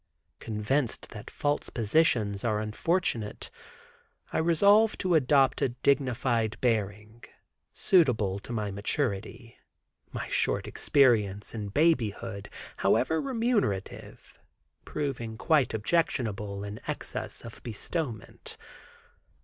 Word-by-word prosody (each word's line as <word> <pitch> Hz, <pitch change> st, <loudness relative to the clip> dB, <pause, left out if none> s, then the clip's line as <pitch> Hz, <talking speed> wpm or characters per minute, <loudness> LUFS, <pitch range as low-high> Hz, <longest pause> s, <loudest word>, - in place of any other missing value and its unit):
Convinced 115 Hz, +4 st, -2 dB
that 105 Hz, -, -9 dB
false 145 Hz, 0 st, -1 dB
positions 110 Hz, -4 st, +1 dB
are 110 Hz, -3 st, +1 dB
unfortunate, 110 Hz, -, -2 dB, 0.8 s
I -, -, +1 dB
resolve 200 Hz, +7 st, +4 dB
to 185 Hz, -2 st, 0 dB
adopt 140 Hz, -3 st, +4 dB
a 135 Hz, -, +2 dB
dignified 125 Hz, -3 st, +1 dB
bearing, 110 Hz, -1 st, -1 dB, 0.5 s
suitable 110 Hz, -, +2 dB
to 110 Hz, -, -10 dB
my 105 Hz, -3 st, -2 dB
maturity, 115 Hz, +2 st, -3 dB, 0.5 s
my -, -, -4 dB
short -, -, 0 dB
experience 105 Hz, -8 st, +2 dB
in 105 Hz, -3 st, -4 dB
babyhood, 115 Hz, -7 st, 0 dB, 0.3 s
however 160 Hz, 0 st, +2 dB
remunerative, 230 Hz, -, -2 dB, 0.5 s
proving 120 Hz, -7 st, -4 dB
quite 150 Hz, +1 st, +2 dB
objectionable 105 Hz, -6 st, -1 dB
in 105 Hz, +1 st, -6 dB
excess -, -, -4 dB
of 115 Hz, -, -10 dB
bestowment. 120 Hz, -, -5 dB
120 Hz, 95 wpm, -28 LUFS, 105-150 Hz, 0.8 s, resolve